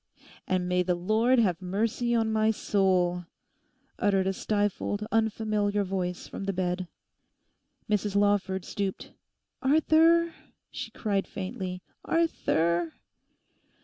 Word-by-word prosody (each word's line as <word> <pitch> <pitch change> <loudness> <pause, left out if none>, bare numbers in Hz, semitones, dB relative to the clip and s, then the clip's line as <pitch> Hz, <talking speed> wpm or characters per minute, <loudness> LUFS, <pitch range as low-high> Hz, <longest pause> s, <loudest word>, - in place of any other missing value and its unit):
'And 185 -1 0
may 180 0 +2
the 180 0 +1
Lord 220 +8 +2
have 190 -7 +2
mercy 225 +6 0
on 225 -1 +1
my 220 0 +3
soul!' 185 -4 +1 0.7
uttered 195 -2 +2
a 190 - +1
stifled, 205 +1 -1
unfamiliar 215 -2 +1
voice 180 -2 -3
from 195 - -6
the 195 - -1
bed. 180 0 -2 1.0
Mrs 210 -1 0
Lawford 200 -2 +1
stooped. 195 -2 -4 0.5
'Arthur!' 320 +4 +4 0.4
she - - -6
cried 200 -3 -1
faintly, 185 -2 -5 0.2
'Arthur! 170 - +1
200 Hz, 110 wpm, -28 LUFS, 185-220 Hz, 1.0 s, Arthur